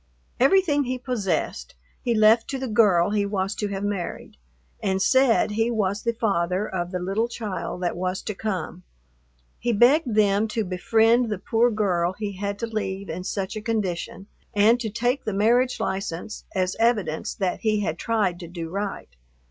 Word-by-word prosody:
Everything 290 0 +4
he 255 +1 -2
possessed 200 - -2 0.3
he 240 -2 0
left 220 +1 +5
to 270 - -2
the 265 0 -4
girl 205 -5 +4
he 210 -1 +1
was 200 -1 -1
to 210 - -3
have 200 0 -4
married, 205 -3 -4 0.5
and 190 -1 0
said 255 +1 +3
he 225 +2 +1
was 205 -3 0
the 235 - 0
father 195 -3 0
of 175 -2 -3
the 180 - -3
little 195 +6 -1
child 200 -6 -5
that 175 - -1
was 185 +1 -3
to 210 - -3
come. 190 -4 -4 0.8
He 240 - 0
begged 240 +2 +4
them 205 0 +3
to 220 0 -2
befriend 225 +6 +2
the 210 - -2
poor 230 +5 +2
girl 185 -5 0
he 205 +1 -4
had 200 +1 -4
to 230 - -3
leave 200 -3 -4
in 180 +3 -5
such 195 +2 -3
a 215 - -4
condition, 200 -4 -3 0.3
and 220 +4 +5
to 225 -3 -3
take 245 +5 -1
the 215 - -2
marriage 240 +5 +2
license 190 +1 -4
as 185 0 0
evidence 210 -9 0
that 190 -3 -1
he 215 -2 +1
had 170 -4 -2
tried 210 -7 0
to 175 - -8
do 165 -1 -6
right. 195 - -5
205 Hz, 180 wpm, -24 LUFS, 185-230 Hz, 0.8 s, left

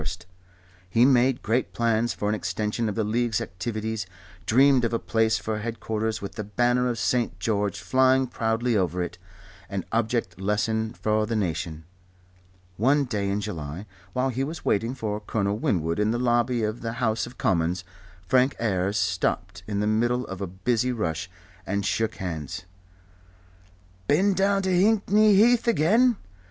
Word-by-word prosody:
He 115 +6 +4
made 130 -1 +3
great 120 +4 0
plans 115 0 +1
for 105 - -3
an 105 - +1
extension 110 +1 -2
of 100 - -4
the 110 - 0
League's, 115 0 0
activities, 110 +2 -4 0.4
dreamed 130 +2 +5
of 115 0 0
a - - +3
palace 110 -1 +1
for 110 -1 -3
headquarters 110 -1 -3
with 100 - -4
the 105 - -5
banner 120 +4 +1
of 120 - -2
St. 120 +3 0
George 105 -4 -1
flying 130 0 +3
proudly 115 0 -1
over 90 -2 0
it, 90 +1 -7 0.5
an 100 -2 -3
object 110 -5 -1
lesson 110 +2 0
for 110 -2 0
the 115 - -1
nation. 85 -5 -2 0.9
One 140 +7 +3
day 105 -5 -2
in 100 +1 -1
July 85 -2 -5 0.3
while 130 +1 +1
he 130 +1 -2
was 155 +4 -6
waiting 115 +5 +1
for 105 -4 -3
Colonel 105 -1 -1
Winwood 85 -5 0
in 105 0 +2
the 120 - 0
lobby 120 -1 +1
of 110 +2 -2
the 115 0 -3
House 115 -1 0
of 125 - -13
Commons, 85 0 0 0.4
Frank 130 +5 +3
Ayres 100 -2 0
stopped 90 -1 -1
in 100 -1 -1
the - - 0
middle 120 +4 +1
of 95 0 -7
a 100 - -2
busy 115 +7 0
rush 90 -7 -2 0.3
and 100 +1 -2
shook 110 +1 0
hands. 80 -4 -5 1.4
"Been 195 +7 +3
down 195 +1 +2
to 190 - 0
Hickney 210 +2 +4
Heath 235 +4 +4
again? 230 +5 +4
110 Hz, 160 wpm, -25 LUFS, 100-125 Hz, 1.4 s, dreamed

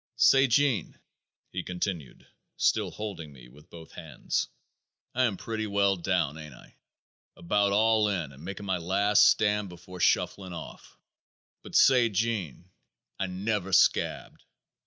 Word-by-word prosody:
"Say, 135 0 +5
Gene," 130 -2 +1 0.5
he - - -3
continued, 90 -6 -5 0.3
still - - +1
holding 100 -8 -7
me 65 -3 -15
with 75 +7 -19
both 80 -1 -13
hands, - - -4 0.7
"I 130 +1 +2
am 105 -5 -1
pretty 110 +1 -4
well 100 -1 +2
down, 85 -4 -1
ain't 75 -4 -10
I? - - -18 0.6
About 100 +3 +1
all 110 +1 +3
in 85 -8 -3
and 70 +2 -15
making 100 +3 -7
my 95 -2 -1
last 100 +4 +3
stand 105 -2 +2
before 90 +1 -12
shuffling 95 +1 0
off." - - -10 0.6
"But - - -10
say, 125 -3 +5
Gene, 95 - -3 0.5
I 95 - -1
never 95 +1 -3
scabbed. - - +1
95 Hz, 135 wpm, -28 LUFS, 85-105 Hz, 0.7 s, Say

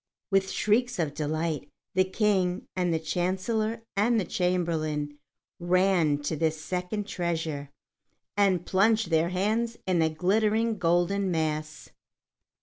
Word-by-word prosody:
With 195 0 +3
shrieks 245 +3 +1
of 155 -5 -1
delight, 155 -1 -2 0.2
the 185 - +4
King 185 -2 0
and 180 -2 +1
the 165 - +2
Chancellor 190 +8 -1
and 225 +3 +3
the 195 - -1
Chamberlain 160 -5 -1 0.4
ran 175 -4 +3
to 155 - -1
this 160 0 0
second 180 +6 -3
treasure, 165 -7 -3 0.7
and 190 -4 +2
plunged 215 0 +2
their 165 +1 +3
hands 220 +5 0
in 185 -2 +1
the 160 -1 +3
glittering 215 +6 +1
golden 175 +3 +2
mass. 155 -2 -2
180 Hz, 125 wpm, -27 LUFS, 160-200 Hz, 0.7 s, the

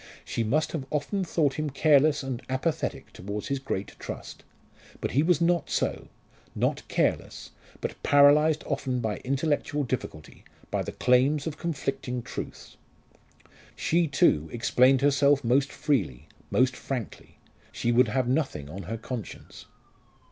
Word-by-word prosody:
She 115 - -2
must 145 +8 +1
have 155 -5 -3
often 155 +7 -1
thought 155 -5 +1
him 155 -1 -1
careless 145 +1 +3
and 130 -2 -4
apathetic 130 +5 -2
towards 100 +3 -6
his 140 -1 -1
great 100 -7 -3
trust. - - -8 0.6
But - - -3
he 140 - +3
was 170 +1 +3
not 170 0 +1
so - - -1 0.5
not - - 0
careless - - -1 0.3
but - - -5
paralysed 145 +2 +5
often 135 -3 -2
by 110 -3 -2
intellectual 145 +2 -1
difficulty, 115 - -5 0.3
by - - 0
the - - -4
claims 130 +4 +2
of 160 -2 -5
conflicting 135 -6 -3
truths. - - -8 1.0
She, 170 0 +1
too, 80 - +2
explained 130 +1 +3
herself 140 0 +3
most 135 +3 +2
freely, 105 - -1 0.2
most 130 0 +2
frankly. 125 -6 -6 0.3
She 120 - -1
would 120 +1 +5
have 125 +3 0
nothing 130 - -1
on 95 - -6
her 110 +5 -5
conscience. 120 -1 -8
135 Hz, 140 wpm, -27 LUFS, 125-150 Hz, 1.0 s, paralysed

